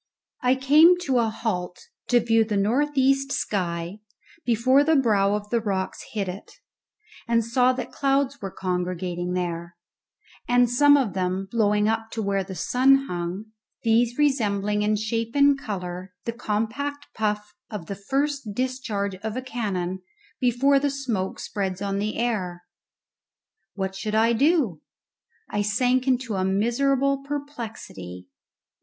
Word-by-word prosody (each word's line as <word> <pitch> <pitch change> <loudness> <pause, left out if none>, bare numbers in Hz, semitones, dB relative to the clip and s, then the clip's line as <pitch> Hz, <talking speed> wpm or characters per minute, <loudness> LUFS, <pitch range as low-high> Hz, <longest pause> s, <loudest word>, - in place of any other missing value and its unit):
I 250 +1 +3
came 300 +7 +6
to 265 -7 +1
a 230 -1 +2
halt 180 -6 -3 0.3
to 245 - +4
view 225 -1 +3
the 210 -2 -2
north 270 +9 +1
east 275 +1 +3
sky 175 -3 -2 0.4
before 255 +4 +4
the 320 +2 +3
brow 205 -7 +3
of 210 0 -6
the 235 -1 +2
rocks 195 -3 -2
hid 205 -3 -1
it, 185 +2 -7 0.7
and 230 -1 +2
saw 250 +2 +3
that 255 - -5
clouds 275 0 0
were 195 - -4
congregating 180 -1 -3
there, 170 -1 -3 0.7
and 245 0 +4
some 285 +4 +5
of 245 -9 0
them 185 +1 -1
blowing 210 -2 +2
up 225 0 -1
to 225 - -2
where 195 -1 0
the 190 0 -8
sun 270 - +3
hung, 180 +5 -4 0.3
these 230 +1 +2
resembling 210 -8 +1
in 210 +1 +2
shape 225 +3 -2
and 280 -1 +5
colour 180 -5 -6
the 230 - -2
compact 245 +6 -3
puff 210 -1 -2 0.2
of 210 -6 -6
the 200 - -5
first 270 +2 -2
discharge 245 -6 -2
of 215 +4 -5
a - - -2
cannon 190 -7 -3 0.4
before 265 +3 +3
the 285 +1 +1
smoke 240 -9 -3
spreads 190 -3 -3
on 200 0 -2
the 210 +1 -2
air. 190 -7 -2 1.1
What 190 -1 -2
should 215 +2 -3
I 225 +2 +4
do? 260 - +2 0.7
I 205 - -1
sank 250 +5 +1
into 255 -3 +1
a 185 - 0
miserable 270 +8 +1
perplexity. 230 - -7
220 Hz, 145 wpm, -25 LUFS, 195-260 Hz, 1.1 s, came